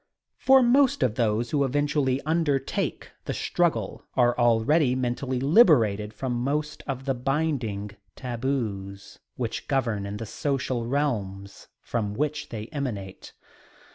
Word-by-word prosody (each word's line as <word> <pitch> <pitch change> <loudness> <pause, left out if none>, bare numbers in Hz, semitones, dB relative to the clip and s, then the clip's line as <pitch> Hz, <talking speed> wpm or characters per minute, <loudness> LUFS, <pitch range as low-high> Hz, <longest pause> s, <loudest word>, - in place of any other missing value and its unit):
For 265 0 +6
most 260 - +4
of 125 -4 +2
those 115 0 0
who 145 -2 +2
eventually 140 -1 +1
undertake 155 -3 -1
the - - -3
struggle - - -1
are 120 -1 +3
already 125 +4 +3
mentally 130 +1 -2
liberated 125 - +4
from 125 +4 -3
most 150 +5 -2
of 135 -1 -4
the 135 - +1
binding 125 -7 -2 0.2
taboos 115 -6 -4 0.2
which 120 -3 -4
govern 115 -8 0
in 100 +1 -5
the 115 - -5
social 130 -1 -2
realms 100 -8 -2 0.2
from 105 -3 -2
which 150 +3 -2
they 110 -2 -5
emanate. 115 - -5
130 Hz, 125 wpm, -26 LUFS, 110-145 Hz, 0.2 s, For